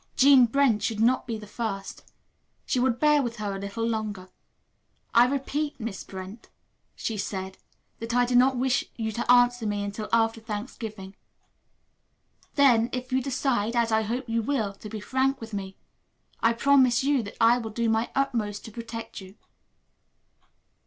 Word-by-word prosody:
Jean 265 -2 +7
Brent 245 -4 +2
should 220 -2 -2
not 245 +4 +2
be 230 -2 -3
the 215 - -10
first. 205 -2 -6 0.5
She 255 - 0
would 245 -1 +1
bear 300 0 +4
with 240 -3 -3
her 205 -3 -4
a - - -5
little 200 +3 -3
longer. 210 -5 -3 0.8
"I 235 +1 +6
repeat, 280 +2 -2
Miss 220 -4 -5
Brent," 190 +4 -9 0.5
she 225 - -3
said, 190 -1 -5 0.4
"that 230 +1 -5
I 245 0 +4
do 245 0 -1
not 255 +1 +4
wish 260 +1 +1
you 220 -1 -3
to 235 +3 0
answer 245 -2 +4
me 205 -1 -1
until 205 +1 -5
after 225 0 +2
Thanksgiving. 210 -3 -7 1.4
Then, 245 -5 +4
if 255 0 -5
you 260 - +2
decide, 245 -4 -1
as 235 -1 +2
I 220 0 +3
hope 240 +4 -3
you 230 0 0
will, 220 -5 -1
to 210 +2 -11
be 215 - -6
frank 265 +5 0
with 225 -1 -9
me, 195 -1 -5 0.6
I 230 +1 +3
promise 260 0 +4
you 280 -2 +2
that 205 - -9
I 235 +1 +5
will 225 -2 -5
do 230 +2 -1
my 225 +1 +1
utmost 230 -7 -1
to 225 - -9
protect 230 -1 -7
you." 190 +1 -13
230 Hz, 170 wpm, -26 LUFS, 210-250 Hz, 1.4 s, Jean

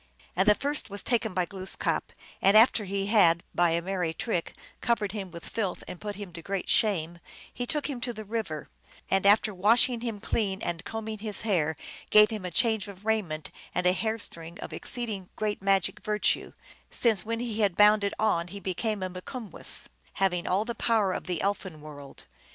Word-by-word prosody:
And 190 +3 +2
the 210 - +7
first 290 +1 -1
was 200 0 -3
taken 225 -5 0
by 180 -1 +2
Glooskap; 190 0 -2 0.3
and 200 +2 +6
after 225 -1 +5
he 195 0 -1
had 175 -6 +5
by 175 -1 +3
a 170 +1 0
merry 180 -3 -2
trick 175 -5 -2 0.3
covered 225 -5 +1
him 200 -3 -5
with 170 -1 -10
filth 200 -6 -3
and 175 - -8
put 205 -1 -4
him 195 -3 -8
to 165 - -8
great 195 +2 -3
shame, 175 -6 +1 0.3
he 245 - -4
took 300 +1 0
him 265 -5 -5
to 245 - -1
the 215 -2 -8
river, 210 -8 -4 0.4
and 195 +1 +3
after 210 +1 +5
washing 230 +6 +3
^him 230 -3 -4
clean 200 -3 -1
and 170 0 -3
combing 220 -1 -5
his 210 -1 -2
hair 165 -8 +1 0.3
gave 210 +1 +7
him 210 -4 -4
a - - -2
change 220 +3 +2
of 200 0 -11
raiment 190 -9 -1 0.2
and 180 - 0
a 180 - +5
hair 220 +3 -1
string 165 -5 -7
of - - -7
exceeding 215 -7 -3
great 210 -2 -2
magic 195 -1 +1
virtue, 210 0 0 0.4
since 225 -5 +2
when 230 +1 -3
he 230 -2 -3
had 200 -4 +2
bound 210 0 +6
it 200 - -1
on 175 -6 +1
he 200 +3 -7
became 200 +2 -2
a - - 0
Mikumwess, 195 - -2 0.3
having 180 -3 0
all 195 +4 +1
the 235 - -3
power 220 -5 +1
of - - -5
the 180 -3 -2
elfin 190 -5 -2
world. 145 -2 -11
200 Hz, 195 wpm, -28 LUFS, 180-220 Hz, 0.4 s, the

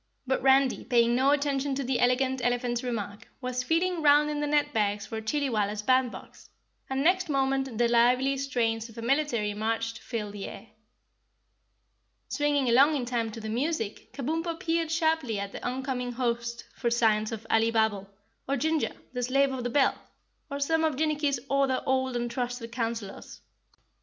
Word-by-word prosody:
But 265 0 0
Randy, 270 0 +3
paying 235 -1 +3
no 260 +3 +3
attention 285 -1 +1
to 275 - -2
the 255 0 0
Elegant 255 +1 +1
Elephant's 245 0 0
remark, 215 -3 -5
was 250 -1 -2
feeling 335 +5 0
round 300 0 +5
in 295 - -2
the 295 - -1
net 295 0 +1
bags 205 -1 0
for 220 -1 -5
Chillywalla's 215 -5 -1
band 255 +1 +3
box, - - -12 0.4
and 265 +1 -1
next 360 +1 +2
moment 270 -3 0
the 240 0 +3
lively 250 +3 +3
strains 235 -4 -1
of 225 - -15
a 230 - -6
military 235 -5 +1
march 225 +2 -2
filled 210 -4 -5
the 200 -1 -6
air. 225 - -10 1.6
Swinging 290 -2 +1
along 275 +6 +5
in 260 -4 -1
time 235 -2 -1
to 225 - -7
the 220 - -6
music, 235 -1 -2
Kabumpo 325 +4 -3
peered 330 -1 0
sharply 320 - +1
at 200 0 -4
the - - -8
oncoming 250 -1 -3
host 235 -1 -2
for 240 - -1
signs 220 -2 +2
of 225 -1 -6
Alibabble, 220 -3 +2 0.4
or 275 - +1
Ginger, 315 +3 0 0.2
the 250 - -2
slave 275 +3 +2
of 255 -2 -4
the 245 - -1
bell, 275 +2 +3 0.6
or 280 -1 -4
some 320 +3 +1
of 315 -3 +1
Jinnicky's 295 -2 0
other 275 -1 +1
old 260 -1 0
and 240 0 -2
trusted 245 -2 -4
counselors. 230 -4 -5
255 Hz, 170 wpm, -28 LUFS, 230-280 Hz, 1.6 s, round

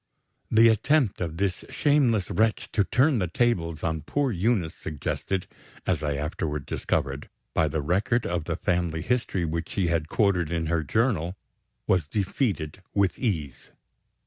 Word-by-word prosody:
The 115 +1 +6
attempt 115 +1 +2
of 85 -2 -3
this 95 -1 -1
shameless 130 - +2
wretch 110 0 +1
to 105 - +3
"turn 130 +5 +3
the 90 - 0
tables" 85 -5 0
on 80 -1 -1
poor 140 - 0
Eunice 95 -4 +1
suggested, 85 +5 -3 0.4
as 85 -5 0
I 75 -2 -1
afterward 75 0 -3
discovered, 70 +1 -2 0.2
by 80 - +3
the 75 0 -2
record 100 +9 +1
of 85 -3 -2
family 85 -2 0
history 120 -7 0
which 85 +1 -3
she 95 -4 0
had 80 -2 0
quoted 90 -6 +2
in 85 -1 -1
her 80 +1 +1
journal 95 - 0 0.5
was 90 -6 +2
defeated 95 - -1
with 100 -3 +2
ease. 80 - -3
90 Hz, 145 wpm, -26 LUFS, 80-110 Hz, 0.5 s, The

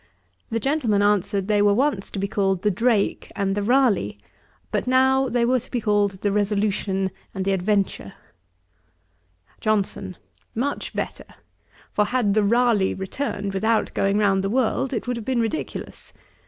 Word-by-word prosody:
The 230 - -1
gentleman 235 -6 +1
answered, 205 -1 +1
they 210 -1 +3
were 205 0 +4
once 250 -6 0
to - - -7
be 195 +1 -1
called 195 -3 0
the 210 - +3
Drake 225 +1 0
and 195 -1 0
the 205 - -1
Ralegh, 210 - +2 0.5
but - - -1
now 265 +1 +3
they 240 -1 +1
were 255 +1 +2
to - - -13
be 245 - -1
called 205 -3 +1
the 205 - +2
Resolution 200 -2 0 0.2
and 190 -1 -2
the 195 - +1
Adventure. 195 - 0 1.5
JOHNSON. 195 -3 -1 0.4
'Much 270 +5 -2
better; - - -4 0.7
for 210 - +2
had 240 -4 +1
the 215 - +3
Ralegh 225 -3 +2
returned 200 -1 -3
without 220 +3 +1
going 195 +1 +1
round 195 -2 +2
the 195 - -1
world, 255 +2 0
it 240 - -3
would 245 -1 -2
have 225 - -7
been 255 -1 0
ridiculous. 230 +7 -4
210 Hz, 160 wpm, -23 LUFS, 195-240 Hz, 1.5 s, were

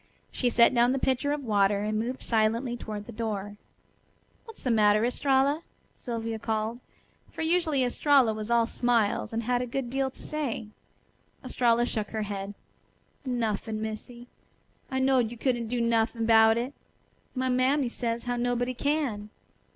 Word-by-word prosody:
She 250 - 0
set 235 +1 +5
down 240 +1 +4
the - - 0
pitcher 265 +2 0
of 295 -1 -2
water 205 -3 +2
and 215 0 -1
moved 250 +4 -3
silently 230 +2 +1
toward 210 -3 -6
the - - -9
door. 205 -2 -4 0.9
"What's 450 -2 -13
the 255 - +1
matter, 215 0 +4
Estralla?" 275 +4 +2 0.3
Sylvia 230 -2 -4
called; 220 +2 -2 0.5
for - - -5
usually 320 -5 +2
Estralla 255 -1 +3
was 215 0 -5
all 235 -1 +4
smiles, 235 -3 0
and 230 +1 -2
had 245 +1 +1
a 250 - -3
good 245 0 -3
deal 270 0 0
to - - -12
say. 280 -8 -3 0.8
Estralla 240 -1 +2
shook 215 -4 -3
her 220 -1 -3
head. 200 0 -5 0.7
"Nuffin', 220 -3 -2
Missy. 220 +2 -6 0.6
I 265 - -2
knowed 260 -3 +3
you 240 - -9
couldn't 240 -1 -1
do 245 +2 -2
nuffin' 230 0 +1
'bout 220 0 +6
it. 250 +4 -3 0.6
My 260 0 0
mammy 255 +2 +2
says 235 -1 -3
how 245 0 -2
nobody 245 +1 0
can." 255 -6 -1
235 Hz, 160 wpm, -28 LUFS, 220-255 Hz, 0.9 s, bout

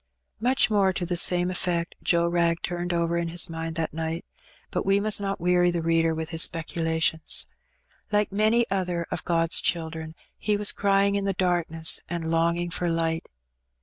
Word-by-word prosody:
Much 250 +1 +2
more 200 -2 +3
to 180 -1 -3
the 175 +1 -2
same 175 +1 +3
eflfect 175 -2 -2
Joe 170 -1 +2
Wrag 170 -1 +1
turned 175 0 -3
over 170 0 0
in 170 0 -1
his 165 0 -1
mind 165 0 -5
that 160 -2 -2
night, 165 +2 -4 0.5
but - - -1
we 195 +1 +3
must 205 0 +1
not 195 -1 -2
weary 175 0 +3
the 170 -1 -2
reader 165 0 +2
with 160 0 -4
his 165 -1 0
speculations. 160 -1 +1 0.6
Like 210 -1 +1
many 215 +4 +2
other 180 -3 -1
of - - -3
God's 165 -1 +2
children, 160 -1 -2 0.2
he 210 -1 0
was 205 0 +4
crying 200 0 +2
in 200 -1 -1
the 195 - 0
darkness 170 -3 +1
and 165 -1 -3
longing 170 +1 +1
for 175 +1 0
light. 165 -1 -1
170 Hz, 180 wpm, -25 LUFS, 165-190 Hz, 0.6 s, was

